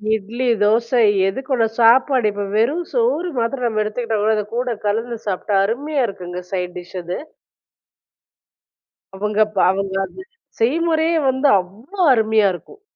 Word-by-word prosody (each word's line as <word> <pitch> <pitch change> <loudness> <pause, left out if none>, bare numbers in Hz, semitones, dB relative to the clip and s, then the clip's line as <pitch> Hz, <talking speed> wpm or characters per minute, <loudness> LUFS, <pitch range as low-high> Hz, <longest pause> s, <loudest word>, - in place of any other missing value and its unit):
இட்லி, 230 +5 -4 0.2
தோசை, 230 +3 +2 0.3
எதுக்கூட 260 +3 -1
சாப்பாடு, 240 +1 +4
இப்போ 205 0 -4
வெறும் 280 +11 +1
சோறு 460 -8 0
மாத்திரம் 245 +2 -1
நம்ம 215 -2 -1
எடுத்துக்கிட்டம்ன்னா, 220 -1 -1
இத 210 - -1
கூட 245 -1 -1
கலந்து 225 +3 -1
சாப்பிட்டா 200 +1 -1
அருமையா 275 +5 -1
இருக்குங்க. 180 -2 -7
சைட் 180 -1 -3
டிஷ் 180 +1 -10
அது. 175 +1 -5 2.0
அவுங்க 210 +2 -1
ப - - -10
அவுங்க 195 0 -3
அது 375 - -11 0.4
செய்முறையே 320 +6 +1
வந்து 265 +2 +1
அவ்வளவு 200 - -11 0.2
அருமையா 220 -2 +3
இருக்கும் 415 - -12
225 Hz, 130 wpm, -19 LUFS, 205-265 Hz, 2.0 s, சாப்பாடு